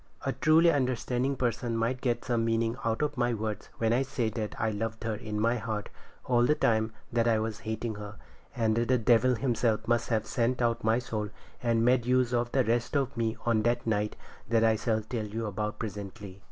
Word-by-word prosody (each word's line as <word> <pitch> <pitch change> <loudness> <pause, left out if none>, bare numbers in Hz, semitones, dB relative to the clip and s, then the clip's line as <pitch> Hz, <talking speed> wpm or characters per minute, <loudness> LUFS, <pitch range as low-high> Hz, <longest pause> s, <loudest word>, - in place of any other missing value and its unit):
A - - 0
truly 165 +2 +5
understanding 130 -1 0
person 120 -2 -1
might 120 +3 -1
get 120 -3 -1
some 120 -2 +1
meaning 115 0 +1
out 115 +5 0
of 150 -2 -2
my 120 -1 +1
words 110 -1 -4
when 115 0 +2
I 125 - +3
say 120 -4 -1
that 110 -1 -5
I 110 0 +1
loved 110 +2 -4
her 115 -1 -1
in 105 0 -4
my 115 +3 +2
heart 110 -1 -4 0.4
all 120 -1 +3
the 150 +5 +4
time 110 -5 +1 0.2
that 115 0 +2
I 115 -1 +4
was 110 0 -3
hating 110 +1 -2
her; 105 +1 -7 0.4
and 110 -2 +1
the 120 +2 +2
devil 120 +2 +4
himself 115 -3 0
must 120 0 +1
have 110 -2 +1
sent 120 +1 0
out 115 -1 +1
my 110 +1 +3
soul 110 -4 -3 0.3
and 115 -1 +2
made 125 -1 +3
use 125 -1 +2
of 120 0 0
the 135 - +3
rest 120 +5 0
of 140 0 -1
me 115 -1 -1
on 115 -2 +3
that 120 +2 0
night 105 -1 0 0.4
I 115 -1 +4
shall 110 0 0
tell 110 0 -4
you 110 +2 -4
about 105 +1 -3
presently. 100 -2 -7
115 Hz, 205 wpm, -29 LUFS, 110-120 Hz, 0.4 s, truly